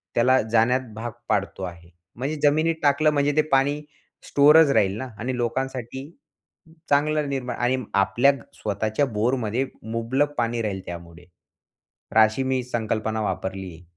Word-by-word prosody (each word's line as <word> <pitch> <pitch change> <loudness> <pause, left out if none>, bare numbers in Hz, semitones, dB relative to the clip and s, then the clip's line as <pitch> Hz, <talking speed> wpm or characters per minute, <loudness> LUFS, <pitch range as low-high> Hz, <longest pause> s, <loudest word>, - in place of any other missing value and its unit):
त्याला 130 +2 +4
जाण्यात 115 +3 +2
भाग 115 +2 -5 0.2
पाडतो 100 -1 -1
आहे, 85 -2 -8 0.3
म्हणजे 135 +6 -3
जमिनीत 155 +3 +3
टाकलं 145 +2 +4
म्हणजे 145 0 +2
ते - - +7
पाणी 140 +2 +2 0.5
स्टोअरच 150 +2 +6
राहील 100 -6 +2
ना, 130 - -5
आणि 125 +3 -2
लोकांसाठी 130 +2 -3 0.8
चांगलं 150 +1 +2
निर्माण 130 -2 -3
आणि 125 +2 +1 0.2
आपल्या 120 +7 +4 0.2
स्वतःच्या 110 +5 -1
बोरमध्ये 120 +1 -1 0.3
मुबलक 130 +6 0
पाणी 120 -1 0
राहील 100 -3 -3
त्यामुळे, 85 0 -9
तर 90 +4 -13
अशी 110 +4 +4
मी 130 -1 0
संकल्पना 110 -2 -2
वापरलीये. 95 -4 -4
120 Hz, 135 wpm, -24 LUFS, 110-140 Hz, 0.8 s, ते